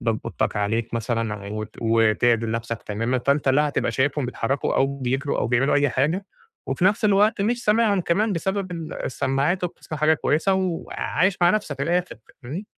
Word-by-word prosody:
باب 115 -2 0
أوضتك - - -2
عليك 110 +3 -1
مثلًا 115 -3 -2
وت 110 0 -6
وتِعدل 115 0 +2
نفسك 115 0 -4
تمامًا، 115 +5 -1
فأنت 140 +2 +1
لا 150 +3 +3
هتبقى - - -1
شايفهم 140 0 0
بيتحركوا 125 +2 -1
أو 140 +1 +1
بيجروا 135 +3 -1
أو - - +1
بيعملوا 120 +4 +2
أي 145 0 +3
حاجة، 155 +10 0 0.4
وفي 180 - -1
نفس 205 +2 +3
الوقت 210 +2 +3
مش 240 +3 -1
سامعهم 210 -2 +3
كمان 200 +5 +1
بسبب 190 +2 -2
ال 165 -2 -6
السماعات 140 +7 0
وبتسمع 160 -3 -6
حاجة 155 +1 +4
كويسة، 160 +5 +1
وعايش 185 +1 -1
مع 175 0 +5
نفسك 155 -10 -2
من 140 - -1
الآخر 180 +1 0 0.3
فاهمني؟ 160 - -6
140 Hz, 175 wpm, -23 LUFS, 120-180 Hz, 0.4 s, مع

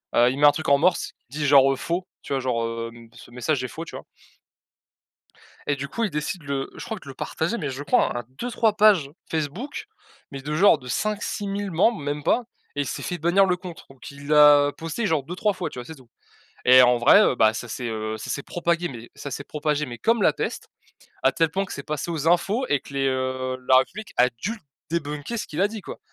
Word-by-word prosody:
heu, 120 +1 +5
il 130 - -3
met 145 - +5
un - - +8
truc 160 +2 -3
en 140 - +6
morse, 180 +6 +1 0.2
qui 150 - -6
dit 150 - 0
genre, 135 -1 +6
heu, - - 0
«faux», 170 +6 -3 0.2
tu - - -5
vois? 135 - +1
Genre, 125 -3 -1 0.3
hem: 115 -1 -15
«ce 120 0 -14
message 125 +2 -1
est - - -2
faux», 165 +6 -7
tu - - -10
vois? - - -8 1.6
Et 145 - +1
du 140 +1 -5
coup, 230 +11 -2
il 210 - -1
décide 150 +4 -3
de 145 - -16
le 140 -1 -3
je - - -7
crois 220 -3 -5
de 140 - -14
le 135 - -8
partager, 160 - -2
mais 145 -3 -3
je 135 +2 -6
crois, 120 - +2
à 120 - -4 0.2
2-3 230 -3 0
pages 195 -10 +5 0.2
Facebook, 165 - -4 0.4
mais 135 -1 -7
de, 150 +2 -3
genre, 190 +6 +5
de 125 - -11
5-6000 205 +2 -2
membres, 200 +7 +2
même 145 +1 -3
pas, 245 - +2 0.3
et 145 - +1
il - - -4
s'est - - -4
fait 175 - -3
bannir 175 +4 +4
le 180 - +1
compte. 180 -2 -10
Donc 135 -1 -12
il 140 0 -12
l'a 150 -1 +6
posté, 165 +8 -3
genre, 160 -6 +1
2-3 180 +8 -1
fois, - - -4
tu - - -10
vois? 120 - -6
C'est 160 - -9
tout 130 -3 -19 0.6
et 130 +1 +9
en 125 -1 +4
vrai, 140 - +7
heu, - - +3
bah, 110 0 +4
ça, 120 +2 -6
s'est 120 +2 -4
heu 110 -1 -4
ça - - -8
s'est 140 - -3
propagé 170 +2 -1
mais 120 -4 -10
ça 140 - -7
s'est 140 +2 -5
propagé 150 0 -1
mais 120 -1 -7
comme 230 - +1
la 155 - +4
peste, - - -4 0.5
à 135 - +4
tel 165 +3 +1
point 195 +3 -1
que - - -11
c'est 140 - -6
passé 150 +2 -4
aux 160 -2 -2
infos 195 +9 +2
et 145 - +2
que 140 - -12
les, 135 - +1
heu, 130 -1 -1
la 130 - +8
République 190 +11 -2
a 125 - +6
dû 225 - -3 0.3
débunker 150 +5 -3
ce - - -3
qu'il 155 +5 -4
a 200 - +4
dit, 215 0 -7
quoi, - - -9
150 Hz, 250 wpm, -24 LUFS, 130-180 Hz, 1.6 s, et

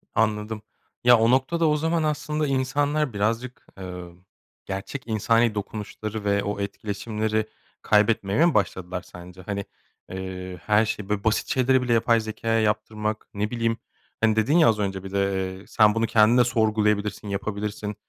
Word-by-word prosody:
Anladım. 105 0 0 0.4
Ya, 120 0 +7
o 115 +2 +4
noktada 160 +6 +2
o 150 - +2
zaman 160 +1 0
aslında 150 0 -1
insanlar 140 +1 0
birazcık, 115 +5 -2
eee, 90 -1 -7 0.6
gerçek 100 +8 -6
insani 115 +1 +2
dokunuşları 105 +1 -5
ve 100 0 +2
o 100 0 -3
etkileşimleri 110 +2 -2 0.3
kaybetmeye 105 +5 +3
mi 170 - +3
başladılar 90 -2 -1
sence? 90 +1 -12
Hani, 100 +1 -4 0.5
eee, 95 -1 -6
her 105 +1 +4
şey 105 -1 -4
böyle, 105 -1 -1
basit 110 0 +1
şeyleri 130 0 +3
bile 120 -2 +1
yapay 115 0 +3
zekâya 115 +1 -1
yaptırmak, 110 0 -2
ne 105 +1 -2
bileyim, 115 -1 0 0.4
hani, 110 -1 +3
dedin 110 +9 +3
ya 165 - +6
az 110 -2 +1
önce 95 -2 -2
bir 95 - -8
de, 95 -1 -1
eee, - - -16
"Sen 105 -1 +4
bunu 115 0 +2
kendin 110 +2 +4
de 125 - +6
sorgulayabilirsin, 105 -3 0
yapabilirsin." 105 +1 -4
110 Hz, 155 wpm, -24 LUFS, 100-120 Hz, 0.6 s, Ya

